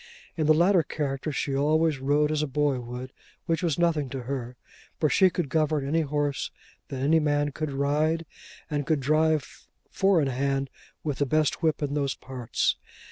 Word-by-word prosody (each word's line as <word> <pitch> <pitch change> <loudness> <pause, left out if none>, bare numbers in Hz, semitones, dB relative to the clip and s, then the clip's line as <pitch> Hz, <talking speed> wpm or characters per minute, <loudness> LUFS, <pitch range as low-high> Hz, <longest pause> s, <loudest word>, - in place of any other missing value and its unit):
In 155 -3 0
the 155 - +7
latter 175 +2 +4
character 145 -1 -3
she 140 -1 -2
always 155 +1 +2
rode 145 +3 +2
as 155 -1 0
a 150 - -1
boy 140 -1 +1
would, 125 +2 -7 0.3
which 165 +1 0
was 165 -5 0
nothing 160 -5 +1
to 130 -1 -5
her, 125 -1 -5 0.4
for 155 - +3
she 190 -1 +5
could 175 -3 -2
govern 150 -1 0
any 165 +3 +2
horse 145 -2 -1 0.4
that 135 -1 -4
any 160 +3 +4
man 145 -1 +1
could 155 +1 -4
ride, 150 +4 +1 0.4
and 145 -2 -2
could 160 -3 +2
drive 155 +2 0 0.2
four 195 -2 +3
in 145 - +1
hand 135 +1 -1 0.3
with 145 -3 -3
the 145 - +1
best 155 +3 +1
whip 160 -2 +1
in 145 -1 -2
those 140 -2 0
parts. 130 -3 -1
145 Hz, 185 wpm, -27 LUFS, 135-155 Hz, 0.4 s, the